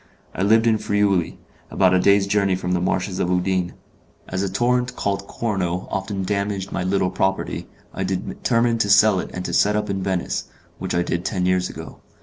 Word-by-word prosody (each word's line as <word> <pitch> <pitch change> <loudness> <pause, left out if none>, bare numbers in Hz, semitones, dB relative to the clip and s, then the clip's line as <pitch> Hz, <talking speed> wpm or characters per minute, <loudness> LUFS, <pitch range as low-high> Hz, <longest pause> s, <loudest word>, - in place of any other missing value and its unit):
I - - -4
lived 110 +3 +4
in 110 -2 +3
Friuli, 100 -5 +1 0.3
about 95 -1 +3
a 95 - +4
day's 100 +1 +4
journey 100 -1 +2
from 90 0 -3
the 90 -1 +1
Marshes 95 +1 -1
of 90 - 0
Udine. 90 0 0 0.5
As 90 +1 -2
a 100 -1 -1
torrent 125 +4 +1
called 100 0 -2
Corno 95 -6 -2
often 95 0 -2
damaged 100 0 -2
my - - -2
little 95 0 +1
property, 95 0 -1 0.3
I 95 - -3
determined 115 +5 0
to 100 - 0
sell 105 -1 +6
it - - -4
and 90 0 -5
to - - -3
set 105 +1 +3
up 105 -1 -1
in 95 -1 -2
Venice, 95 -2 -2 0.3
which - - -3
I 85 - +2
did 85 0 -2
ten 95 -2 -1
years 90 0 +1
ago. - - -9
95 Hz, 195 wpm, -22 LUFS, 90-105 Hz, 0.5 s, sell